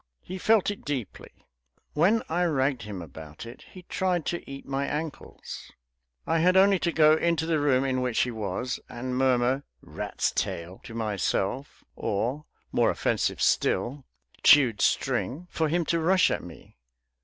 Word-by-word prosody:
He 185 +1 -7
felt 215 0 +3
it 205 - -9
deeply. 135 -8 -6 0.5
When 195 +9 +3
I 175 +2 +1
ragged 135 -5 +1
him 100 -5 -6
about 80 - -10
it 115 - -11
he 185 - -12
tried 180 -2 -1
to 175 - -2
eat 135 0 -8
my 140 +1 -2
ankles. 150 0 -6 0.5
I 165 - +1
had 180 +3 +4
only 195 0 +5
to 170 - 0
go 155 -1 +5
into 160 0 +1
the 160 -2 +1
room 135 -3 +3
in 130 -1 0
which 125 -2 +1
he 125 - 0
was, 110 +3 -3
and 125 +1 -4
murmur, 130 0 +2 0.2
"Rat's - - -2
tail," 85 +3 -3
to 115 - -9
myself, 110 +3 -2
or 125 +9 -2 0.3
(more - - +3
offensive - - 0
still) 135 +3 +1 0.4
"Chewed 125 -8 +6
string," 155 +8 0
for 160 -2 0
him 170 +1 +1
to 170 - +1
rush 180 +3 +3
at - - -2
me. 85 -7 -13
140 Hz, 160 wpm, -27 LUFS, 120-170 Hz, 0.5 s, Chewed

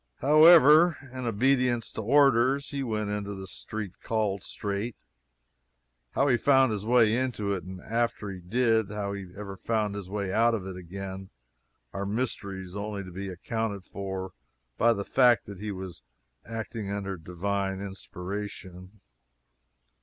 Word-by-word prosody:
However, 155 +2 +7 0.2
in 130 -1 -4
obedience 125 +1 +2
to - - -4
orders, 135 +2 +4
he 140 -1 -3
went 110 -5 -2
into 100 -1 -3
the 95 0 -7
"street 95 - -7
called 105 -3 -1
Straight" 105 +3 -4 1.2
(how 140 - +2
he 125 -3 +4
found 135 -1 +4
his 105 -2 -3
way 115 -1 +4
into 120 -5 -1
it, 95 - -3
and 95 0 -8
after 115 -2 -1
he 95 - -7
did, 110 +2 +2
how 100 -1 -3
he 95 -3 -7
ever 100 -1 -6
found 110 0 -1
his 100 -3 -6
way 100 -2 -3
out 115 +1 +4
of 100 -4 -5
it 95 -1 -6
again, 95 +1 -7 0.6
are 100 0 -3
mysteries 100 -5 -3
only 100 -1 -4
to 90 - -10
be 95 +2 -5
accounted 100 +2 -3
for 95 -1 -5 0.4
by 115 - +4
the 100 -3 -2
fact 125 -4 +4
that 100 -2 -9
he 105 +1 -4
was 95 -2 -7 0.4
acting 115 -2 -5
under 100 -1 -3
Divine 95 +3 -2
inspiration.) 95 0 -7
105 Hz, 150 wpm, -28 LUFS, 95-115 Hz, 1.2 s, However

